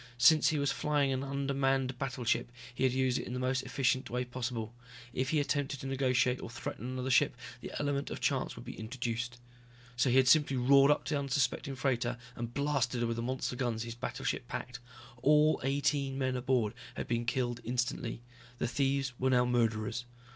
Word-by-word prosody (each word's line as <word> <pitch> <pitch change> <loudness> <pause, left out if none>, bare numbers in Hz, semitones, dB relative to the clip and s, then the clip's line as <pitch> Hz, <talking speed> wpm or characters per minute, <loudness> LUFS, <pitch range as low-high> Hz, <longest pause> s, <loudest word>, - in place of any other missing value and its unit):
Since 155 +5 +6
he 155 - 0
was 140 -1 +1
flying 145 -2 +1
an 130 0 -1
undermanned 135 -2 0
battleship, 125 -3 -1 0.2
he 130 - 0
had 130 - +3
used 130 -1 +1
it - - -6
in 125 - -5
the 125 - -2
most 130 +1 0
efficient 130 +1 0
way 125 +1 -1
possible. 120 -2 -4 0.4
If 130 0 -1
he 155 - +2
attempted 145 -1 -1
to - - -7
negotiate 130 -1 +1
or - - -6
threaten 120 +1 -6
another 130 +1 -2
ship, 125 - +4 0.2
the - - -7
element 145 -1 -1
of - - -5
chance - - 0
would - - -10
be - - -7
introduced. 120 +1 -3 0.6
So 120 +2 +2
he 125 - +4
had 130 -1 +5
simply 140 0 +5
roared 135 +3 +6
up 150 - +3
to 155 - -2
the 145 - +1
unsuspecting 140 0 0
freighter 125 -2 0 0.2
and 120 0 -5
blasted 135 -3 0
her - - +2
with 115 0 -2
the - - -1
monster 130 +1 -2
guns 120 -3 -1
his 115 -1 -5
battleship 120 - -3
packed. 125 0 -5 0.4
All 150 +3 +4
eighteen 140 0 0
men 130 -1 0
aboard 125 -4 +1 0.2
had - - -4
been 120 0 -1
killed 120 -1 -1
instantly. 120 -1 -2 0.3
The - - -1
thieves 135 +1 0
were 130 - +2
now 125 -1 +4
murderers. 115 -1 0
130 Hz, 195 wpm, -32 LUFS, 120-140 Hz, 0.6 s, Since